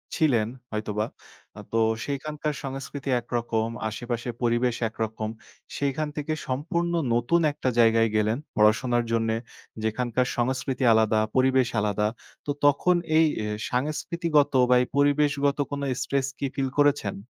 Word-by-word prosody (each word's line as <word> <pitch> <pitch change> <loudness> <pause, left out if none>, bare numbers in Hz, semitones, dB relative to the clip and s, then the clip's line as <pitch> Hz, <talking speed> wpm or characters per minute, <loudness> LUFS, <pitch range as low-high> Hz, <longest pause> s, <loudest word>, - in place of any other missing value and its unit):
ছিলেন 125 - +2 0.2
হয়তোবা। 105 0 -2 0.5
আ - - -7
তো 115 - +3 0.3
সেখানকার 150 +2 -3
সংস্কৃতি 135 +1 -5
একরকম 115 -2 -1 0.2
আশেপাশের 120 +2 -4
পরিবেশ 120 0 +2
একরকম। 110 -1 -3 0.5
সেখান 140 +2 -1
থেকে 155 +1 -2
সম্পূর্ণ 170 +6 -1 0.2
নতুন 120 +9 +2
একটা 130 -2 -2
জায়গায় 115 -1 +5
গেলেন 110 +2 +2 0.2
পড়াশোনার 120 +3 +3
জন্যে 115 -1 +1 0.5
যেখানকার 120 +3 0
সংস্কৃতি 130 +2 -1
আলাদা 110 -1 +3 0.2
পরিবেশ 130 -1 +3
আলাদা। 105 0 +1 0.4
তো 145 - -1
তখন 175 +5 +4 0.2
এই 160 - +6 0.5
সাংস্কৃতিগত 150 +2 0 0.2
বা 125 - +6
এই 125 - -1
পরিবেশগত 145 0 +2
কোনো 140 0 -3 0.2
স্ট্রেস 140 -1 0
কি 140 - 0
ফিল 135 -2 0
করেছেন? 140 -9 +2
130 Hz, 125 wpm, -26 LUFS, 115-145 Hz, 0.5 s, এই